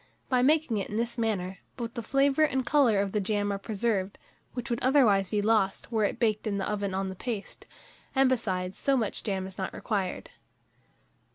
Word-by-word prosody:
By 255 -2 +3
making 295 -3 +3
it 195 - -3
in 210 - -3
this 235 +1 -1
manner, 195 -4 -1 0.2
both 235 -2 -4
the 235 - -4
flavour 275 +5 +2
and 265 -4 +2
colour 260 -9 +4
of 200 -1 -2
the 210 - 0
jam 205 0 0
are 200 - -3
preserved, 205 -2 -1 0.4
which 245 0 -4
would 235 - -1
otherwise 230 -8 +4
be 210 -1 0
lost, 215 -1 +1
were 220 -2 +2
it - - -2
baked 215 -2 +1
in 200 -2 -1
the 195 - -2
oven 200 -2 -2
on 190 0 -1
the 190 - -6
paste; 220 0 -6 0.5
and, 270 0 +5
besides, 190 -7 -1
so 275 -1 +2
much 225 -4 -2
jam 190 -2 -2
is 190 0 -9
not 190 - -3
required. 195 -5 -3
215 Hz, 200 wpm, -28 LUFS, 195-245 Hz, 0.5 s, and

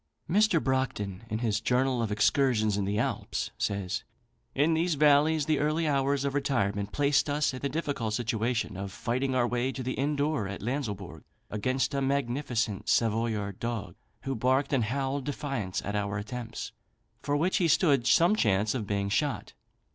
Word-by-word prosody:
Mr. 205 0 +3
Brockedon, 130 -9 -1
in 110 - -1
his 105 -1 0
"Journal 125 +1 +1
of 110 -2 -1
Excursions 110 0 +2
in 100 -1 -1
the 100 +1 -1
Alps," - - -2
says: 100 -3 -2 0.5
"In 150 +4 +3
these 165 +1 +1
valleys, 150 +1 +4
the 155 -1 +1
early 155 +2 +1
hours 140 -1 +1
of 140 - -1
retirement 105 -8 0
placed 145 0 +2
us 145 -1 +1
in 130 - -5
the 140 - -2
difficult 140 -7 -2
situation 115 -1 -1
of 100 0 -5
fighting 130 +5 -1
our 120 -1 +3
way 120 +2 0
to 130 0 -5
the 130 +1 -2
inn 145 +2 0
door 145 -7 0
at 100 0 -6
Lanslebourg 105 - -4 0.3
against 130 +5 0
a 140 - 0
magnificent 125 -5 -1
Savoyard 110 -3 0
dog, 110 -6 -3 0.3
who 135 - -2
barked 130 +4 +1
and 125 -5 +2
howled 135 +3 -2
defiance 135 -10 -3
at 100 - -3
our 100 0 -1
attempts, 115 +2 -6 0.5
for 145 0 0
which 175 +5 +1
he 175 - +2
stood 145 -6 +3
some 175 +5 +5
chance 105 - +2
of 115 -6 -3
being 100 -1 -1
shot. 140 +8 -1
130 Hz, 170 wpm, -29 LUFS, 105-140 Hz, 0.5 s, some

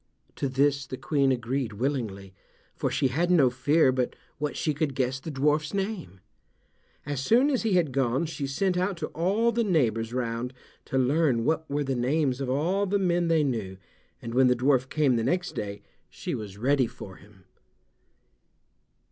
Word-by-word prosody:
To 140 - -1
this 140 0 +1
the 130 - -6
Queen 140 -2 +1
agreed 125 -1 -2
willingly, 105 -6 -3 0.4
for - - -1
she 135 - +1
had 165 +7 0
no 150 -8 +5
fear 140 +3 +3
but 125 -1 -1 0.2
what 150 0 -2
she 155 - 0
could 145 -2 -2
guess 130 0 0
the 145 - -7
dwarf's 150 +4 0
name. 190 - -4 0.8
As 145 -2 -3
soon 245 - +4
as 260 - +1
he 220 -3 0
had 170 -6 +2
gone 130 +3 +1
she 155 -3 -4
sent 180 +7 0
out 185 0 -1
to 155 -2 -4
all 200 +8 +1
the 235 +1 +1
neighbors 115 - +1
round 120 0 -3 0.3
to 130 - -2
learn 130 -2 +2
what 160 0 0
were 145 +1 0
the 135 -1 -1
names 130 +1 0
of 135 - -2
all 175 +9 +1
the 200 +2 +1
men 175 -3 +1
they 165 -2 +3
knew, 110 -9 -2 0.5
and 115 - -5
when 130 +1 +5
the 125 - +4
dwarf 130 +1 +2
came 140 -5 +2
the 115 - 0
next 180 +8 0
day 100 0 -5 0.3
she - - -5
was 100 -3 -6
ready 130 +2 +2
for 95 -4 -11
him. 95 -1 -19
135 Hz, 180 wpm, -27 LUFS, 125-160 Hz, 0.8 s, no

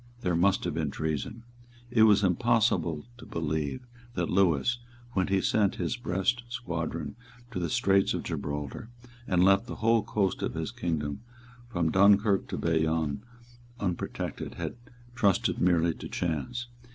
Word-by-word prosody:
There 90 -5 +1
must 95 +3 +3
have 85 - -1
been 80 -2 -1
treason. 80 +11 -3 0.5
It 120 -3 +3
was 105 0 +5
impossible 95 -6 +2
to - - -10
believe 80 - -2 0.3
that 85 -2 -1
Lewis, 95 - +3 0.3
when 95 -5 +1
he 95 -1 +2
sent 105 -3 +2
his 85 -2 -1
Brest 120 0 0
squadron 85 -9 -4 0.4
to 105 - -3
the 85 -2 -1
Straits 95 +4 +3
of - - -3
Gibraltar, 75 - -4 0.4
and 90 -1 +3
left 100 +4 +4
the - - -5
whole 115 0 +3
coast 100 -2 -1
of - - -2
his - - -3
kingdom 75 -4 -2 0.5
from 85 -8 0
Dunkirk 100 +1 +4
to - - -4
Bayonne 80 0 0 0.6
unprotected, 90 -4 -3
had - - -4 0.4
trusted 105 -6 +2
merely 85 -2 +3
to - - -8
chance. 105 - -2
90 Hz, 145 wpm, -29 LUFS, 80-105 Hz, 0.6 s, was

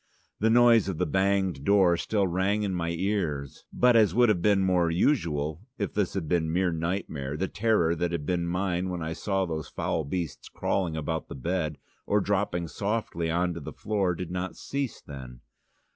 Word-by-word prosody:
The 110 - +3
noise 115 -3 +5
of 95 - -3
the 90 - +1
banged 95 -3 +1
door 95 -1 +4
still 100 +3 0
rang 95 +4 0
in 100 -2 -1
my 85 -2 -1
ears. 85 - -2
But, 125 -1 +4
as 105 -5 +4
would 120 -1 +5
have 95 -5 +2
been 100 0 +3
more 90 -2 +2
usual, 80 - 0 0.2
if 100 - -3
this 100 -3 -1
had 90 -5 -2
been 80 -1 +1
mere 90 +1 +1
nightmare, 80 -4 -3
the 95 - -1
terror 105 -7 +2
that 85 +1 -1
had 85 -4 -3
been 85 0 0
mine 90 +1 -1
when 90 -2 -3
I 80 +1 -3
saw 95 +2 -1
those 80 -3 -4
foul 80 - -2
beasts 85 +1 -4
crawling 85 -5 -1
about 80 +1 -3
the - - -8
bed 80 +1 -2 0.3
or 105 - +3
dropping 95 -4 0
softly 100 -4 -2
on 90 +2 +1
to 85 - -6
the 70 - -7
floor 100 -4 0
did 90 0 -6
not 90 +1 -3
cease 140 -3 -4
then. 65 -4 -10
90 Hz, 190 wpm, -27 LUFS, 80-100 Hz, 0.3 s, noise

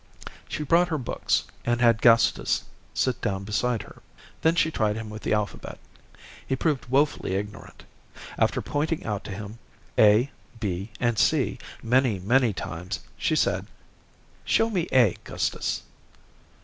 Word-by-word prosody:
She 150 - -3
brought 170 +4 +4
her 160 -3 -1
books, 130 - 0 0.2
and 120 0 +1
had 115 -2 +4
Gustus 115 -2 +4 0.3
sit 130 -2 0
down 95 -1 -1
beside 110 +3 0
her. - - -15 0.4
Then 160 +1 +3
she 160 -1 +2
tried 105 -7 0
him 110 -1 -6
with 110 0 -7
the - - 0
alphabet. 105 -1 -3 0.7
He 130 - +1
proved 135 -4 -1
woefully 135 -7 +1
ignorant. 105 +1 -6 0.6
After - - +2
pointing 150 +2 -1
out 105 -2 -2
to - - -6
him, 105 +3 -7 0.4
A, 110 +5 +5 0.3
B, 100 -1 -3
and 120 -4 +1
C, - - +2 0.2
many, 125 -2 +3
many 120 +6 +3
times, 90 0 -5
she - - 0
said: - - +1 0.8
"Show 225 0 +2
me 180 -4 0
A, 120 -8 +4
Gustus." - - -2
115 Hz, 145 wpm, -26 LUFS, 105-135 Hz, 0.8 s, A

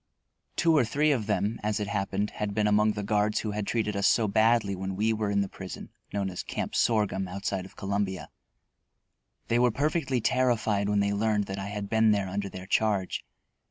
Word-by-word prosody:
Two 165 -2 +3
or 145 - +5
three 150 +6 +2
of 115 -7 0
them, 105 +1 0
as 105 0 -1
it 105 - -1
happened, 100 0 -1
had 100 -1 -4
been 105 -1 +2
among 105 +1 +3
the 105 -1 -4
guards 105 +1 +1
who 110 - -3
had 105 -1 -3
treated 110 -3 0
us 100 0 +2
so 115 -2 +3
badly 110 -1 +3
while 95 +1 -4
we 105 +4 +1
were 105 -1 -1
in 100 0 +2
the 100 - -1
prison 95 -1 -9 0.2
known 100 -1 -1
as 90 - -4
"Camp - - -4
Sorghum," 105 -4 +1
outside 95 0 -3
of - - -21
Columbia. 100 -1 -2 1.2
They 120 - +2
were 125 0 +5
perfectly 140 +1 0
terrified 110 -5 +1
when 105 -1 +2
they 100 0 +1
learned 105 0 +1
that 95 0 -5
I 95 - -4
had 100 0 -4
been 110 +1 +3
there 100 -2 +2
under 100 +1 -3
their 95 0 -8
charge. 100 -1 0
105 Hz, 205 wpm, -28 LUFS, 100-110 Hz, 1.2 s, or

